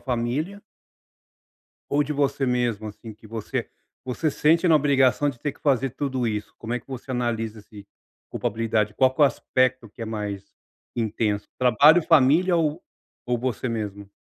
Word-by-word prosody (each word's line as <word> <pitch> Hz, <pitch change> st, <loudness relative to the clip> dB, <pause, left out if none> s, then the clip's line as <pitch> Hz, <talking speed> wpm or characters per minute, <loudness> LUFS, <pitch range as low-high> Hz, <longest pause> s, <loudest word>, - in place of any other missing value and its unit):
família 135 Hz, +10 st, -2 dB, 1.3 s
ou 145 Hz, +1 st, +3 dB
de 150 Hz, +1 st, -3 dB
você 140 Hz, -1 st, 0 dB
mesmo, 120 Hz, -4 st, 0 dB
assim, 110 Hz, +1 st, -10 dB
que 110 Hz, +1 st, -17 dB
você 110 Hz, 0 st, -4 dB, 0.4 s
você 130 Hz, +5 st, -1 dB
sente 165 Hz, +5 st, +3 dB
na 165 Hz, -, +5 dB
obrigação 140 Hz, -1 st, +3 dB
de 120 Hz, -, -14 dB
ter 145 Hz, +3 st, -3 dB
que -, -, -25 dB
fazer 135 Hz, -2 st, +1 dB
tudo 130 Hz, -1 st, -2 dB
isso? 105 Hz, -2 st, -3 dB
Como 115 Hz, +2 st, -4 dB
é 125 Hz, -, -2 dB
que -, -, -33 dB
você 135 Hz, 0 st, -8 dB
analisa 115 Hz, -3 st, -2 dB
esse 100 Hz, -1 st, -14 dB, 0.4 s
culpabilidade? 110 Hz, -1 st, -1 dB
Qual 130 Hz, +1 st, +3 dB
que -, -, -5 dB
é 145 Hz, -, +9 dB
o -, -, +8 dB
aspecto 130 Hz, -3 st, 0 dB
que 115 Hz, +3 st, -10 dB
é -, -, -2 dB
mais 105 Hz, -3 st, -4 dB, 0.5 s
intenso? 110 Hz, -2 st, -1 dB
Trabalho, 145 Hz, +7 st, +6 dB
família 165 Hz, +4 st, +4 dB
ou 160 Hz, 0 st, 0 dB, 0.4 s
ou 120 Hz, -1 st, -1 dB
você 125 Hz, 0 st, -2 dB
mesmo? 100 Hz, -3 st, -5 dB
125 Hz, 170 wpm, -24 LUFS, 110-140 Hz, 1.3 s, é